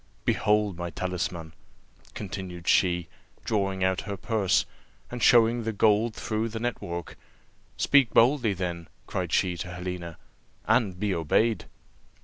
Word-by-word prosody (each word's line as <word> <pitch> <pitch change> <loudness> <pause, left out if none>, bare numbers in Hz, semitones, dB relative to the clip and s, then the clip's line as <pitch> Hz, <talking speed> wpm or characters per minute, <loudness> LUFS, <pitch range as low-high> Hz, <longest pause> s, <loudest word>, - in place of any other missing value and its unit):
Behold 105 -3 +1
my 85 0 -4
talisman," 85 -3 -4 0.6
continued 90 -4 -6
she, 90 -3 +3 0.4
drawing 95 -3 0
out 95 0 +1
her 100 -1 -5
purse, 105 -4 +1 0.5
and 125 0 -5
showing 115 +1 +5
the 115 0 -2
gold 110 +2 +2
through 110 +1 -2
the 110 0 -5
net 120 0 -2
work. 85 -1 -6 0.6
"Speak 140 -5 +4
boldly, 120 -3 +4
then," 85 -3 -4 0.2
cried - - -3
she 90 -1 +2
to 90 - -5
Helena, 90 -2 -6 0.5
"and 110 -5 +1
be 105 -1 0
obeyed." 105 +8 +1
100 Hz, 130 wpm, -27 LUFS, 90-110 Hz, 0.6 s, showing